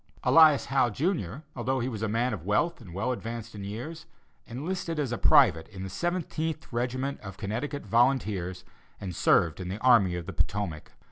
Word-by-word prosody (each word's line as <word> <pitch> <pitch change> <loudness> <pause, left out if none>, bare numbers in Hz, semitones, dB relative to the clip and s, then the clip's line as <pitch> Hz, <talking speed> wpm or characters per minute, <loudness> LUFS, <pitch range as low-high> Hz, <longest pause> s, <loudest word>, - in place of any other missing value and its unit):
Elias 155 -4 +6
Howe, 135 -3 +2
Jr., 140 - -2
although 130 +2 -1
he 120 - -1
was 110 -5 -5
a 110 - 0
man 115 +3 0
of 90 -7 -5
wealth 105 - 0
and 95 -6 -11
well 100 +8 -1
advanced 115 -1 -5
in 100 -2 -7
years, 125 +11 -7 0.4
enlisted 165 +6 -4
as 140 -5 -1
a 120 - -1
private 80 0 +5
in 95 -2 -8
the 95 - -6
Seventeenth 160 - -3
regiment 130 +3 -2
of 95 -2 -9
Connecticut 125 +8 -4
volunteers 105 -6 +1 0.3
and 95 -4 -6
served 80 +1 +3
in 90 - -5
the 95 - -3
Army 115 -8 +5
of 85 -1 -5
the - - -6
Potomac. 90 -7 -3
120 Hz, 185 wpm, -28 LUFS, 100-140 Hz, 0.4 s, Elias